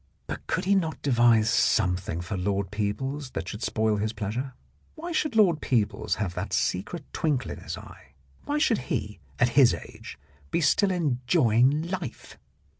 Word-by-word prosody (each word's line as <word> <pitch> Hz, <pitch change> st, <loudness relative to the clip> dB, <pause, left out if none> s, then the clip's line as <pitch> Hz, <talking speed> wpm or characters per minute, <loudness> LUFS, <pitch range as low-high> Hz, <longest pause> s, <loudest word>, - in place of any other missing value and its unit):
But -, -, -7 dB
could -, -, -1 dB
he 200 Hz, -, +3 dB
not 165 Hz, -6 st, 0 dB
devise 120 Hz, -4 st, +4 dB
something 90 Hz, -6 st, +1 dB
for 90 Hz, +4 st, -4 dB
Lord 95 Hz, +1 st, -1 dB
Peebles 125 Hz, +7 st, -3 dB
that -, -, -4 dB
should 105 Hz, -, -6 dB
spoil 110 Hz, -2 st, +1 dB
his 110 Hz, +2 st, -1 dB
pleasure? 115 Hz, +5 st, -4 dB, 0.4 s
Why 340 Hz, +3 st, -6 dB
should 305 Hz, -6 st, 0 dB
Lord 180 Hz, -8 st, +4 dB
Peebles 110 Hz, -4 st, 0 dB
have 100 Hz, -5 st, -3 dB
that -, -, -4 dB
secret 150 Hz, -, -1 dB
twinkle 140 Hz, -7 st, -1 dB
in -, -, -7 dB
his -, -, -6 dB
eye? 65 Hz, -, -14 dB, 0.3 s
Why 295 Hz, -, -1 dB
should 275 Hz, -7 st, +2 dB
he, 105 Hz, -, -3 dB, 0.2 s
at 125 Hz, -, +3 dB
his 130 Hz, 0 st, +5 dB
age, -, -, -10 dB, 0.3 s
be -, -, 0 dB
still 185 Hz, +5 st, +3 dB
enjoying 135 Hz, -, +2 dB
life? 170 Hz, -6 st, -6 dB
125 Hz, 165 wpm, -27 LUFS, 105-160 Hz, 0.4 s, his